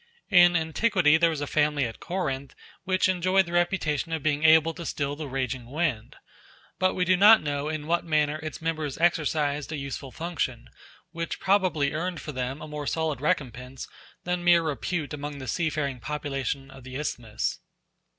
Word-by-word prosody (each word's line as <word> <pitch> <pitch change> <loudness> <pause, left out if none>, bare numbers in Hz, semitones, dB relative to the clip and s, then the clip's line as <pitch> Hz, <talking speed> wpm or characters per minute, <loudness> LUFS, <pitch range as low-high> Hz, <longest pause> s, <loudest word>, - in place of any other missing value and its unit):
In 175 -1 +7
antiquity 160 0 +3
there 170 +1 +4
was 155 -3 -3
a - - -1
family 150 -1 +1
at 115 - -6
Corinth 140 -7 -3 0.3
which 185 0 +2
enjoyed 185 +1 +2
the 170 - -8
reputation 175 -3 0
of 160 -3 -2
being 150 -1 +1
able 160 0 +6
to 170 - -8
still 145 -3 -2
the 150 0 -6
raging 130 -2 -3
wind; 145 -5 -2 0.6
but 185 0 +2
we 180 - +1
do 185 +1 +4
not 210 +2 +7
know 145 0 -2
in 155 -1 -4
what 170 +2 +1
manner 155 -2 +1
its 155 0 -7
members 155 -4 -2
exercised 150 -3 +1
a 155 - -3
useful 140 -1 -6
function, 150 -7 -4 0.4
which 165 0 -4
probably 185 -8 +2
earned 175 +2 -2
for 150 - -6
them 130 +1 -4
a - - -7
more 150 -1 -5
solid 160 -4 -1
recompense 130 -3 -2 0.4
than 180 0 -2
mere 175 -1 +5
repute 155 0 -2
among 145 0 -5
the 130 -1 -8
seafaring 150 -5 -1
population 135 +1 -3
of 135 -1 -13
the 130 0 -9
isthmus. 120 -6 -3
155 Hz, 175 wpm, -26 LUFS, 140-170 Hz, 0.6 s, In